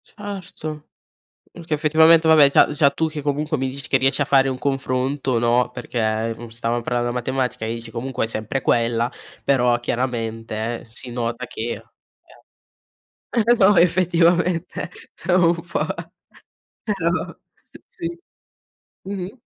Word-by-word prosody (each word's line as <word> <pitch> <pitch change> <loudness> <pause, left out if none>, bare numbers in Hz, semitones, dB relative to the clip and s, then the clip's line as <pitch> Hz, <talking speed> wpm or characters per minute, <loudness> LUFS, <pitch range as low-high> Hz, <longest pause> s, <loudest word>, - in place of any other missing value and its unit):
Certo, 180 -7 -8 0.6
perché 165 -2 -6
effettivamente 160 +2 +5
vabbè 150 -3 +7
già - - +5
già 145 -1 +3
tu 160 +3 0
che 155 -2 -6
comunque 150 +2 -1
mi 135 0 -1
dici 135 +1 -4
che 135 - +3
riesci 135 +2 +1
a - - +3
fare 135 0 +4
un 130 -1 -2
confronto 135 -1 -1
no, 120 +1 +2
perché, 115 -2 -2
mhmm, 120 -1 -9
stavam 115 +1 -2
parlando 120 0 -1
della 120 - -2
matematica 125 -2 -2
e 110 - -2
dici 115 0 -7
comunque 125 +1 -3
è - - -7
sempre 110 +4 -3
quella, 120 0 +1 0.3
però 125 -3 +3
chiaramente 115 -2 -3
si 120 +2 -10
nota 120 +1 -3
che 115 +1 -5 1.5
eh, 235 0 +3
no 200 +1 +5
effettivamente 175 0 +2 0.4
è - - +2
un 175 -2 +5
po' 170 -2 -3 1.0
però 180 -5 -1 0.5
sì. 345 -8 -6 0.9
Mh-mh. 195 +4 -6
135 Hz, 135 wpm, -22 LUFS, 120-165 Hz, 1.5 s, vabbè